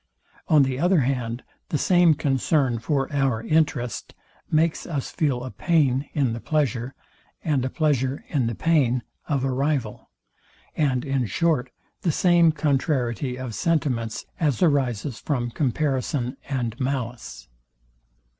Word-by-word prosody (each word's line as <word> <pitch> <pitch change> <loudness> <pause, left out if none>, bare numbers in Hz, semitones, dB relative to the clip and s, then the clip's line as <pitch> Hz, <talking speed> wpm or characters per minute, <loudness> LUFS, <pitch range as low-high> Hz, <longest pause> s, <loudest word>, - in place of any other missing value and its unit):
On 150 -3 +6
the 130 -1 -1
other 175 0 +3
hand, 125 -2 -2 0.3
the 150 - 0
same 175 -1 +4
concern 135 -3 +1
for 135 +2 0
our 135 -6 +1
interest 130 -4 0 0.3
makes 160 +1 +1
us 145 -6 -3
feel 135 -6 0
a 130 - -6
pain 145 -5 +1
in 135 -6 +1
the 115 - -4
pleasure, 130 -3 -1 0.5
and 145 -6 +1
a 130 - -1
pleasure 140 -3 0
in 135 -7 0
the 115 - -2
pain 130 -7 +2 0.2
of 140 -3 0
a 135 - 0
rival; 135 -4 -2 0.7
and 135 -4 +1
in 135 -4 0
short 135 - +1 0.3
the 170 - +1
same 170 0 +4
contrariety 135 - 0
of 130 -3 -5
sentiments 125 -8 -1
as 150 -2 +1
arises 135 -6 +1
from 120 -5 -2
comparison 135 -1 -1
and 120 -3 -2
malice. 130 -3 -4
135 Hz, 135 wpm, -24 LUFS, 125-155 Hz, 0.7 s, On